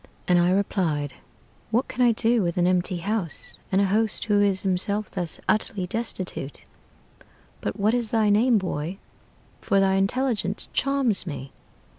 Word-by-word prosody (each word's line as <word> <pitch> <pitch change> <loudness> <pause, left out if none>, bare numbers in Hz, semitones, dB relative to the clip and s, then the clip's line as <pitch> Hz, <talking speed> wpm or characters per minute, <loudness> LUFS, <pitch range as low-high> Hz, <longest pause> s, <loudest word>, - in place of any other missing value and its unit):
"And 180 -1 +4
I 175 +1 +3
replied, 170 -7 0 0.6
'What 235 +4 +1
can 255 - -4
I 240 - +6
do 230 +1 +2
with 170 -2 -1
an 175 - +3
empty 180 0 +1
house, 190 -1 -3 0.2
And 190 - +3
a 200 - +4
host 215 +3 +1
who 205 -2 +3
is 195 -2 +2
himself 200 +2 -1
thus 175 -4 -3
utterly 210 -3 +1
destitute? 185 - -4 1.0
But 105 - -4
what 210 +3 +3
is 240 -3 -1
thy 215 -2 +2
name, 230 +3 +4
boy? 180 -2 -3 0.6
for 195 - +1
thy 195 0 +3
intelligence 210 -1 -1
charms 270 -9 +1
me.' 135 -4 -6
195 Hz, 155 wpm, -25 LUFS, 180-220 Hz, 1.0 s, I